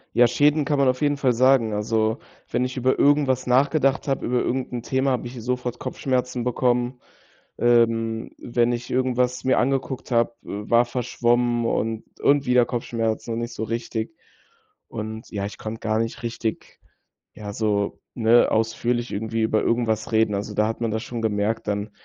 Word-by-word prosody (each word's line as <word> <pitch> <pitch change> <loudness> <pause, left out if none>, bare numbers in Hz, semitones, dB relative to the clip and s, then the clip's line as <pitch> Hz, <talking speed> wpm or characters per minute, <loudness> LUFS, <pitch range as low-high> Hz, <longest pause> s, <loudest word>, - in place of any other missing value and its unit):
Ja, 120 +1 +7
Schäden 145 +5 +3
kann 145 -1 0
man 135 - +4
auf 130 +2 +1
jeden 145 -1 +2
Fall 130 -3 +2
sagen. 125 -2 +4
Also, 110 +1 0 0.3
wenn 125 +1 0
ich 125 +1 -5
über 130 +1 +2
irgendwas 140 -3 +3
nachgedacht 135 +2 +2
habe, 135 - -1
über 125 0 +1
irgend 130 +1 -2
'n 120 - -3
Thema, 130 +3 0
habe 125 -1 -1
ich 120 0 -8
sofort 125 0 -2
Kopfschmerzen 125 -2 -2
bekommen. 125 0 0 0.6
Ähm, 115 -1 +2
wenn 120 0 0
ich 120 0 -4
irgendwas 125 -1 0
mir 130 - +2
angeguckt 130 0 -1
habe, 115 0 +2
äh, 105 +1 -7
war 120 +1 +5
verschwommen 120 -1 0
und 110 -1 -1 0.2
und 140 0 +3
wieder 125 -1 +4
Kopfschmerzen 115 -1 -2
und 115 - -2
nicht 120 0 -4
so 110 - -4
richtig 115 +4 -4 0.7
Und, 110 0 -6
ja, 100 -2 -3
ich 105 - -7
konnte 110 +1 -6
gar 110 0 0
nicht 115 0 -3
richtig, 115 -1 -4 0.6
ja, 105 -1 -7
so, 105 -2 -1 0.2
ne, 120 0 +4
ausführlich 115 +2 0
irgendwie 110 +2 -2
über 110 0 +2
irgendwas 115 -2 0
reden. 110 -1 +3
Also, 105 +1 -4
da 105 - +3
hat 115 +1 -4
man 115 - 0
das 110 +1 -2
schon 120 -2 -5
gemerkt 110 0 -1
dann, 105 +1 -2
120 Hz, 175 wpm, -23 LUFS, 110-125 Hz, 0.7 s, Ja